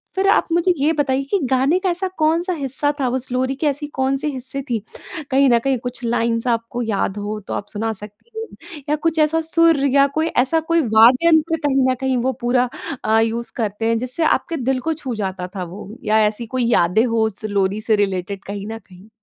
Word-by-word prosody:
फ़िर 385 Hz, +1 st, +1 dB
आप -, -, +3 dB
मुझे 345 Hz, +2 st, +3 dB
ये 290 Hz, +3 st, +2 dB
बताइए 275 Hz, -2 st, 0 dB
कि 400 Hz, -, +2 dB
गाने 270 Hz, +7 st, +2 dB
का 375 Hz, 0 st, 0 dB
ऐसा 360 Hz, +2 st, -1 dB
कौन-सा 330 Hz, +4 st, +1 dB
हिस्सा 285 Hz, -1 st, 0 dB
था 265 Hz, -, +1 dB
उस 255 Hz, -1 st, -5 dB
लोरी 260 Hz, +1 st, 0 dB
की 300 Hz, +3 st, -1 dB
ऐसी 290 Hz, +1 st, -2 dB
कौन 265 Hz, +1 st, +1 dB
से 290 Hz, -, -3 dB
हिस्से 270 Hz, -1 st, -3 dB
थी, 235 Hz, -2 st, 0 dB, 0.5 s
कहीं 270 Hz, 0 st, +4 dB
न 235 Hz, -1 st, +4 dB
कहीं 270 Hz, +2 st, 0 dB
कुछ 245 Hz, 0 st, -6 dB
लाइन्स 230 Hz, 0 st, 0 dB
आपको 235 Hz, +1 st, -1 dB
याद 205 Hz, -2 st, -1 dB
हों 210 Hz, +1 st, -4 dB
तो -, -, -4 dB
आप 205 Hz, -, -4 dB
सुना 225 Hz, +2 st, -2 dB
सकती 210 Hz, -, -11 dB
हों 450 Hz, -, -3 dB, 0.4 s
या 300 Hz, -, +3 dB
कुछ 320 Hz, +1 st, -1 dB
ऐसा 310 Hz, +1 st, +3 dB
सुर 330 Hz, 0 st, +4 dB, 0.2 s
या 280 Hz, 0 st, +6 dB
कोई 320 Hz, +1 st, +2 dB
ऐसा 295 Hz, +2 st, +2 dB
कोई 335 Hz, -1 st, +4 dB
वाद्ययंत्र 300 Hz, +8 st, +4 dB
कहीं 270 Hz, -2 st, +2 dB
न -, -, 0 dB
कहीं 265 Hz, -1 st, +1 dB
वो 255 Hz, +2 st, 0 dB
पूरा 245 Hz, +1 st, +2 dB, 0.3 s
अ, 220 Hz, +1 st, +3 dB
यूज़ 230 Hz, +1 st, -1 dB
करते 220 Hz, -1 st, -2 dB
हैं 230 Hz, -, +2 dB
जिससे 255 Hz, +7 st, -2 dB
आपके 330 Hz, +1 st, 0 dB
दिल 260 Hz, -1 st, 0 dB
को 320 Hz, -, +2 dB
छू 260 Hz, -5 st, -5 dB
जाता 190 Hz, -3 st, -4 dB
था 185 Hz, -, -3 dB
वो। 185 Hz, +4 st, -9 dB, 0.2 s
या 215 Hz, +1 st, +3 dB
ऐसी 215 Hz, +3 st, -3 dB
कोई 250 Hz, -2 st, +1 dB
यादें 180 Hz, +5 st, +3 dB
हो 230 Hz, -2 st, +1 dB
उस 215 Hz, 0 st, -3 dB
लोरी 200 Hz, 0 st, 0 dB
से 220 Hz, 0 st, +2 dB
रिलेटेड 195 Hz, -1 st, -2 dB
कहीं 200 Hz, 0 st, -6 dB
न 225 Hz, 0 st, -6 dB
कहीं? 190 Hz, 0 st, -18 dB
250 Hz, 220 wpm, -20 LUFS, 220-295 Hz, 0.5 s, या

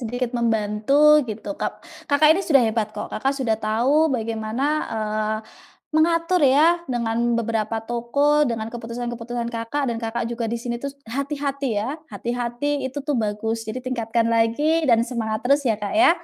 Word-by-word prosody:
sedikit 245 Hz, +1 st, -2 dB
membantu 220 Hz, +1 st, 0 dB, 0.3 s
gitu 215 Hz, 0 st, -6 dB
Kak. -, -, -1 dB, 0.4 s
Kakak 285 Hz, +1 st, +5 dB
ini 360 Hz, -, 0 dB
sudah 275 Hz, -5 st, +6 dB
hebat 220 Hz, -1 st, 0 dB
kok. 210 Hz, -, -4 dB
Kakak 270 Hz, +5 st, 0 dB
sudah 225 Hz, -4 st, +1 dB
tahu 225 Hz, +5 st, +1 dB, 0.2 s
bagaimana, 225 Hz, +2 st, -3 dB, 0.3 s
eee, 215 Hz, 0 st, -1 dB, 0.6 s
mengatur 335 Hz, +2 st, +3 dB
ya 305 Hz, +6 st, +5 dB
dengan 230 Hz, -2 st, -1 dB, 0.2 s
beberapa 225 Hz, -1 st, -1 dB
toko, 285 Hz, +6 st, +2 dB
dengan 220 Hz, -1 st, -3 dB
keputusan-keputusan 235 Hz, 0 st, -4 dB
Kakak, 230 Hz, +6 st, -2 dB
dan 225 Hz, -, -4 dB
Kakak 230 Hz, +1 st, -2 dB
juga 235 Hz, 0 st, -3 dB
di -, -, 0 dB
sini 240 Hz, -1 st, -3 dB
terus 280 Hz, +1 st, -6 dB, 0.2 s
hati-hati 280 Hz, 0 st, -2 dB
ya, 210 Hz, +4 st, -2 dB, 0.2 s
hati-hati 240 Hz, +5 st, -3 dB, 0.2 s
itu 265 Hz, +2 st, -5 dB
tuh 295 Hz, -3 st, +1 dB
bagus. 215 Hz, +2 st, -2 dB
Jadi 220 Hz, -, -3 dB
tingkatkan 230 Hz, -2 st, 0 dB
lagi 295 Hz, +8 st, +2 dB
dan 230 Hz, -2 st, +5 dB
semangat 220 Hz, -3 st, -3 dB
terus 280 Hz, +3 st, +3 dB
ya, 220 Hz, -, +3 dB
Kak, 205 Hz, -, -2 dB
ya. 350 Hz, -, +7 dB
235 Hz, 160 wpm, -23 LUFS, 225-275 Hz, 0.6 s, ya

